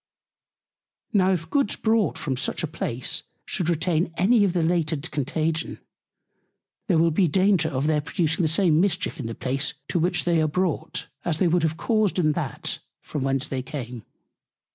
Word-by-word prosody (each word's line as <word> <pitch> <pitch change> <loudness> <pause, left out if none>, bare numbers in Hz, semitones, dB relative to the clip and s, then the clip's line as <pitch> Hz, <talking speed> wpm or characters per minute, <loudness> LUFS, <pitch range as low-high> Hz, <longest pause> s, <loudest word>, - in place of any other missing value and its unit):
Now 190 -2 +4
if 165 -3 -1
Goods 245 +3 +1
brought 220 -5 +1
from 135 -3 -2
such 130 - -1
a - - 0
Place 130 -5 -2 0.2
should 175 -2 -1
retain 170 0 +1
any 210 +4 +4
of 190 -3 +2
the 175 -2 +1
latent 160 -3 0
Contagion, 155 +3 -1 1.1
there 180 -6 +3
will 165 +1 +4
be 175 +3 +3
Danger 185 0 +3
of 135 0 -1
their 155 -1 +2
producing 160 +2 0
the 165 - +3
same 165 -1 +3
Mischief 185 -4 0
in 125 - -3
the 115 - -5
Place, 135 +3 -1
to 175 - +1
which 175 +2 +1
they 170 -2 +2
are 155 - +2
brought, 180 +1 -1 0.2
as 165 -3 0
they 180 - +2
would 175 +1 +2
have 160 0 0
caused 215 -1 +1
in 155 -4 +3
that, 150 -6 -3 0.2
from 150 - -4
whence 135 +1 0
they 130 -1 -3
came. 125 -5 -6
165 Hz, 180 wpm, -25 LUFS, 150-180 Hz, 1.1 s, Now